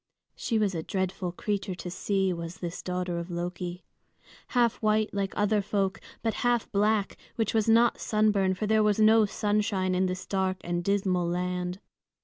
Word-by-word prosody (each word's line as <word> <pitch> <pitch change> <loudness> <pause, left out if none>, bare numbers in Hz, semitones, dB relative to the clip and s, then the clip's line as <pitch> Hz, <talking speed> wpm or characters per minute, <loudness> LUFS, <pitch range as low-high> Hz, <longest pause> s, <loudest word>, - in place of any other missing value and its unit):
She 230 - -1
was 210 -3 +1
a 165 - -2
dreadful 185 0 -2
creature 200 -1 -3
to 180 0 -7
see, 190 0 0
was 170 +1 -6
this 175 -1 -5
daughter 180 -1 -2
of 170 +1 -6
Loki, 175 +1 -4 0.6
half 240 -2 +2
white 215 0 +1
like 200 -1 -1
other 210 0 +2
folk, 195 -1 -1 0.2
but 225 -1 +1
half 240 -2 +2
black, 210 0 +1 0.2
which 225 -2 0
was 220 0 +2
not 230 +1 +4
sunburn, 210 -3 +2
for 215 - -2
there 220 +1 +3
was 210 0 +2
no 220 0 +6
sunshine 205 -3 0
in 185 +1 +2
this 185 0 -4
dark 190 -1 0
and 175 0 -2
dismal 190 -2 +1
land. 180 +1 -2
195 Hz, 170 wpm, -28 LUFS, 180-215 Hz, 0.6 s, no